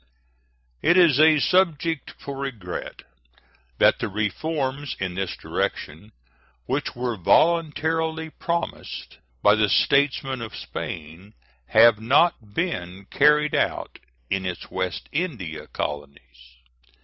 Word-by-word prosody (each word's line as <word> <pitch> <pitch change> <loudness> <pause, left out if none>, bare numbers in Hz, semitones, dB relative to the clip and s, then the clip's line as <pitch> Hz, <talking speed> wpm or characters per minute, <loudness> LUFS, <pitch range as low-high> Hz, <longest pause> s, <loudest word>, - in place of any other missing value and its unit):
It 175 - +4
is 165 -7 +5
a 155 0 +6
subject 165 -2 +1
for 140 - -7
regret 120 -10 -6 0.7
that - - +4
the - - -2
reforms 135 +7 -2
in 95 -2 -3
this 95 0 -3
direction 80 +9 -4 0.5
which - - -2
were 120 -1 -2
voluntarily 160 - +1
promised 170 +2 -4 0.2
by 105 - +7
the 105 -1 +2
statesmen 135 -1 +2
of 115 -1 -7
Spain 85 +6 -7 0.3
have 110 0 +6
not 120 -4 +2
been 95 - -3
carried 150 +1 +4
out - - -1 0.3
in 95 +4 -1
its 90 -2 -6
West 95 -1 -3
India 125 - -4
colonies. 60 -4 -7
125 Hz, 110 wpm, -24 LUFS, 95-155 Hz, 0.7 s, by